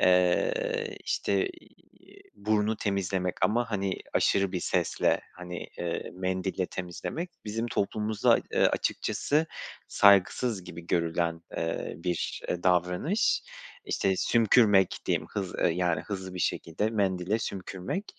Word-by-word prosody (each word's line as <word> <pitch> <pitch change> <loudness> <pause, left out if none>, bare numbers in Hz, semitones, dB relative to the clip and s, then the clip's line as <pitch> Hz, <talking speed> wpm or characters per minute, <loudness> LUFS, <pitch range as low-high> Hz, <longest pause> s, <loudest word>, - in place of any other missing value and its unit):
eee, 460 - +2
işte, 390 - +1
iii, 370 +2 -18
burnu 110 0 +1
temizlemek 95 -3 -1
ama, 115 +1 +2
hani, 95 -2 0 0.2
aşırı 100 -1 +3
bir 90 - -1
sesle, - - +1
hani, 90 -1 -7 0.2
eee, 85 -1 -3
mendille 95 0 -1
temizlemek 95 - -5
bizim 115 +2 -2
toplumumuzda, 105 -1 +2
eee, - - +2
açıkçası 155 +3 0 0.4
saygısız 100 +1 +4
gibi 85 -1 -9
görülen, 85 -1 0
eee, 80 0 -2
bir, 90 +1 -2
eee, 90 - -2
davranış. 90 - +2 0.4
İşte, 95 -1 0
sümkürmek 105 -4 +4
diyeyim, - - 0
hız 95 -3 -3 0.2
yani, 85 -2 +1
hızlı 95 +1 -6
bir - - -5
şekilde 85 +5 -1
mendile 100 -1 0
sümkürmek. 95 - -4
95 Hz, 115 wpm, -28 LUFS, 90-110 Hz, 0.4 s, saygısız